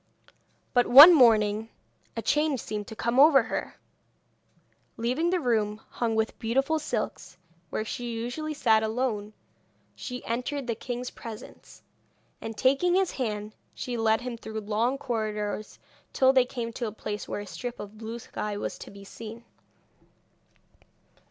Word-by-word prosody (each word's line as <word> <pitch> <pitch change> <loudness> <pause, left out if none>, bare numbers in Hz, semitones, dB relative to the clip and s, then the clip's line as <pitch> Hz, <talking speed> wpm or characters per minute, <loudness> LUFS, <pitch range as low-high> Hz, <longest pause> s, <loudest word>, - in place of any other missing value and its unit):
But 245 -1 +3
one 290 +8 +11
morning 220 -5 +4 0.5
a - - -2
change 295 -3 +1
seemed 210 -1 -5
to 220 - -8
come 235 +3 0
over 280 -3 +7
her. - - -4 1.2
Leaving 255 +9 0
the 365 0 +1
room 220 -6 0
hung 230 -2 -1
with 220 0 -1
beautiful 270 +7 +1
silks, 180 - -4 0.3
where 215 - -3
she 240 +2 -4
usually 245 +7 -4
sat 220 -6 +3
alone, 220 -2 -2 0.6
she 250 -1 -7
entered 250 +4 -3
the 235 - -1
king's 245 +2 -5
presence, 225 -2 -11 0.6
and 225 -1 -6
taking 275 - +3
his 380 -1 +2
hand 215 -4 -4 0.2
she 245 - -4
led 225 0 +2
him 245 -1 -5
through 220 -1 -6
long 225 +5 0
corridors 215 -4 -3 0.4
till 265 0 +4
they 260 -2 +5
came 235 -2 -5
to 240 -1 -3
a - - -4
place 210 0 -6
where - - -4
a - - -8
strip 245 +4 -6
of 205 +1 -9
blue 225 +1 -6
sky 210 -3 -5
was - - -5
to - - -9
be 200 0 -12
seen. 225 +3 -10
230 Hz, 150 wpm, -27 LUFS, 215-255 Hz, 1.2 s, one